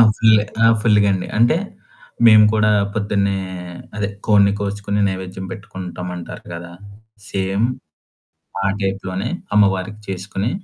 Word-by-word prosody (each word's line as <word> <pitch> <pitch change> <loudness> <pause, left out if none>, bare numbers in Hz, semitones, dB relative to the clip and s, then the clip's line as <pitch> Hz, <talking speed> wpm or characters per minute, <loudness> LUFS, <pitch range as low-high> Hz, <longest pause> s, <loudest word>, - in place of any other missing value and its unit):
Full 110 -1 +5 0.2
ఆ! - - +7
ఫుల్లుగాండి. 100 -4 +2
అంటే 120 +5 +4 0.7
మేము 110 -2 +8
కూడా 105 0 +3 0.2
పొద్దున్నే 100 -2 0 0.6
అదే 105 -2 -1 0.2
కోడిని 100 -1 +5
కోచుకొని 100 0 -2
నైవేద్యం 95 0 -6
పెట్టుకుంటాం 90 -3 -7
అంటారు 85 - -9
కదా! 85 0 -8 0.6
సేమ్ 95 +3 0 1.0
ఆ - - +3 0.2
టైప్‌లోనే 95 -1 -2 0.3
అమ్మవారికి 100 +1 +2
చేసుకొని 95 +3 -3
100 Hz, 105 wpm, -19 LUFS, 95-105 Hz, 1.0 s, మేము